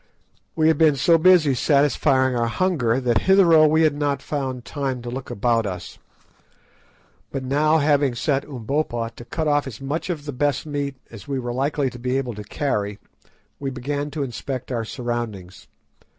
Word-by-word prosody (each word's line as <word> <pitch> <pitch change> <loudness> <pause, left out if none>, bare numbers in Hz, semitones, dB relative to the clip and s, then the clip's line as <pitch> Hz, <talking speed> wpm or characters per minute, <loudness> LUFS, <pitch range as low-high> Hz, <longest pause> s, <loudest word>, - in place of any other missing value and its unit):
We 155 -1 +3
had 160 - +3
been 155 -3 +5
so 165 +4 +4
busy 165 -5 +5
satisfying 135 -1 +2
our 120 -1 +1
hunger 130 -4 +1
that 120 -3 +2
hitherto 170 -5 +6
we 160 +1 +3
had 155 -2 +3
not 145 -1 -1
found 135 -4 -4
time 135 -4 -3
to 120 - -5
look 130 +1 -6
about 115 0 +1
us. 90 -2 -7 1.3
But 135 -1 -4
now, 150 +4 +2
having 145 -4 +2
set 140 +3 0
Umbopa 120 -3 -2
to - - -10
cut 160 +5 -3
off 145 -1 +2
as 115 -5 -8
much 145 +6 -4
of 155 -5 -4
the 145 - -5
best 145 +2 0
meat 145 -2 -3 0.2
as 115 +3 -11
we 140 -1 -2
were 120 -2 -3
likely 135 +1 0
to 125 - -10
be 125 +2 -1
able 125 -3 -2
to 105 0 -8
carry, 105 -3 -2 0.6
we 140 - -3
began 140 +3 -3
to 145 0 -3
inspect 130 0 -5
our 115 -2 -2
surroundings. 115 -7 -5
135 Hz, 180 wpm, -22 LUFS, 120-150 Hz, 1.3 s, hitherto